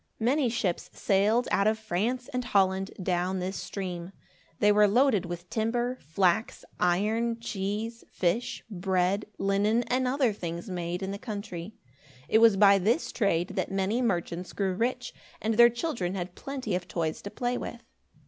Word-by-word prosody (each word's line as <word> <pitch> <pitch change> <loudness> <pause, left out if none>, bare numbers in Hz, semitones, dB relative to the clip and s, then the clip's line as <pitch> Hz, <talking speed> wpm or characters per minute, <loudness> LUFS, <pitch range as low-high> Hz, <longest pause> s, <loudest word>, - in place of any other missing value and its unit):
Many 255 +3 +2
ships 200 -6 -2
sailed 210 +5 +2
out 200 - +3
of 220 0 +2
France 220 +5 -2
and 250 0 -1
Holland, 195 -3 +2
down 180 +1 0
this 185 +1 -3
stream. 180 -2 -5 0.4
They 210 - +4
were 210 0 +5
loaded 220 -3 +3
with 175 0 -6
timber, 240 +3 -1
flax, 180 +6 0
iron, 220 +6 +1
cheese, 220 +1 -3
fish, 185 +7 -1
bread, 190 0 0
linen, 205 +4 +2
and 255 +1 0
other 255 -3 +2
things 170 0 -5
made 175 +1 -3
in 190 - -3
the 200 - -5
country. 205 -3 -6 0.5
It 220 - +4
was 225 -3 +6
by 200 -1 +6
this 225 - +1
trade 180 -6 +1
that 195 -1 -2
many 195 +5 0
merchants 180 -5 -2
grew 195 -2 0
rich, 250 +5 -2 0.3
and 220 +1 0
their 235 +2 +8
children 235 - -2
had 180 -1 -4
plenty 265 -5 -5
of 180 0 -2
toys 160 -2 -2
to 200 - -6
play 245 +3 -2
with. 240 -1 -6
200 Hz, 160 wpm, -28 LUFS, 185-235 Hz, 0.5 s, their